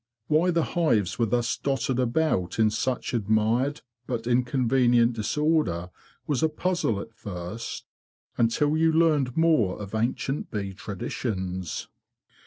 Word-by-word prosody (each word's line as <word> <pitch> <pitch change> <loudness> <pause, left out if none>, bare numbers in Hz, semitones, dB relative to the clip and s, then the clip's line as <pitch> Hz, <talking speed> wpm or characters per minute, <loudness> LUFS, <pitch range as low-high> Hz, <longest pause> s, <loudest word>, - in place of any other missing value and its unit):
Why 155 +6 +3
the 170 -2 +2
hives 115 - +1
were 115 - +3
thus 120 +2 0
dotted 135 -2 -1
about 125 - 0
in 110 -1 +4
such 125 +4 -2
admired 115 +6 +1 0.3
but 120 -3 -3
inconvenient 125 -1 +3
disorder 110 - 0 0.3
was 145 -6 0
a 160 - +3
puzzle 155 - -1
at 115 - -8
first, 95 +2 -6 0.5
until 145 +6 +2
you 160 +1 +3
learned 155 -6 +2
more 155 - +3
of 100 -1 -8
ancient 120 +5 -1
bee 100 -2 -4
traditions. 95 -4 -4
120 Hz, 125 wpm, -26 LUFS, 105-150 Hz, 0.5 s, in